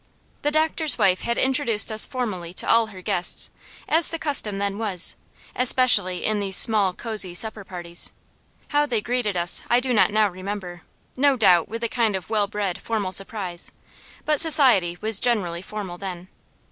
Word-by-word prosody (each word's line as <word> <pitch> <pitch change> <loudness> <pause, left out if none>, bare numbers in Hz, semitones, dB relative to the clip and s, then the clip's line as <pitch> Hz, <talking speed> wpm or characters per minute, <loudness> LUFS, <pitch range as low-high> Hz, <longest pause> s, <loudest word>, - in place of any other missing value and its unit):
The 295 - -1
doctor's 315 0 0
wife 185 -1 +1
had 235 0 -3
introduced 255 -5 +1
us 215 0 +4
formally 190 -10 -6
to - - -1
all 230 -1 +2
her 190 -4 -13
guests, 175 0 +3 0.4
as 325 +1 +5
the 330 - -5
custom 275 -10 +1
then 200 +1 -4
was, 195 -6 +1 0.4
especially 245 -8 +2
in 215 -1 -1
these 195 -2 +2
small 210 -4 +3
cosy 205 -3 -3
supper 220 +2 -2
parties. 175 -2 -6 0.6
How 295 0 0
they 240 -5 -2
greeted 225 -3 -3
us 175 0 +5
I 240 - +3
do 255 0 -3
not 195 -5 +2
now 215 0 +1
remember; 185 -2 -8 0.3
no 275 0 +1
doubt, 180 -7 +2
with 230 +1 -7
a - - 0
kind 225 -3 -2
of 185 -1 -8
well 210 -2 0
bred 200 -3 -5
formal 210 -5 -4
surprise; 190 -2 -3 0.5
but 300 -2 +1
society 250 - +6
was 215 -2 +1
generally 195 -9 -2
formal 190 -3 -9
then. 185 -2 -9
210 Hz, 170 wpm, -21 LUFS, 185-240 Hz, 0.6 s, society